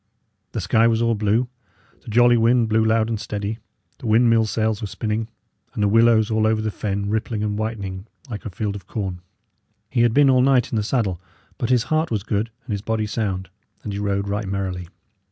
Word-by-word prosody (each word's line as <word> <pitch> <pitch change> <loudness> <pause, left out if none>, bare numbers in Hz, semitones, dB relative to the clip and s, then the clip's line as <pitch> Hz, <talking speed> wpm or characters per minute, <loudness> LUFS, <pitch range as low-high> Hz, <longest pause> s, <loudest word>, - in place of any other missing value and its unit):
The - - -2
sky 115 +1 +3
was 115 -1 +2
all 115 0 +2
blue; 110 +3 +1 0.5
the - - -27
jolly 120 +2 +5
wind 115 0 +3
blew 110 0 +3
loud 110 0 +2
and 115 -2 -2
steady; 105 0 -4 0.4
the 120 - -6
windmill 115 0 +4
sails 110 0 -1
were 105 - -3
spinning; 110 +3 -2 0.5
and 105 - 0
the - - +4
willows 115 +1 +4
over 110 0 +2
all 110 - +3
the 110 0 -2
fen 100 -1 -3
rippling 110 0 -1
and 105 -1 -1
whitening 105 -3 -4 0.2
like 110 -5 -6
a - - -5
field 100 +2 -3
of 95 -2 -9
corn. 95 -5 -4 0.7
He 120 - +2
had 120 -1 +4
been 140 -1 +6
all 130 -1 +4
night 130 -1 +3
in - - -1
the 110 - +2
saddle, 105 -6 -1 0.4
but 120 - -1
his 125 -2 +3
heart 155 +3 0
was 105 -4 -1
good 110 0 -1 0.2
and 125 - -6
his 100 -1 -2
body 110 0 -1
sound, 100 -4 -2 0.4
and 105 - -4
he 100 - -3
rode 100 -1 -1
right 100 +1 -2
merrily. 95 -2 -3
110 Hz, 210 wpm, -22 LUFS, 100-115 Hz, 0.7 s, been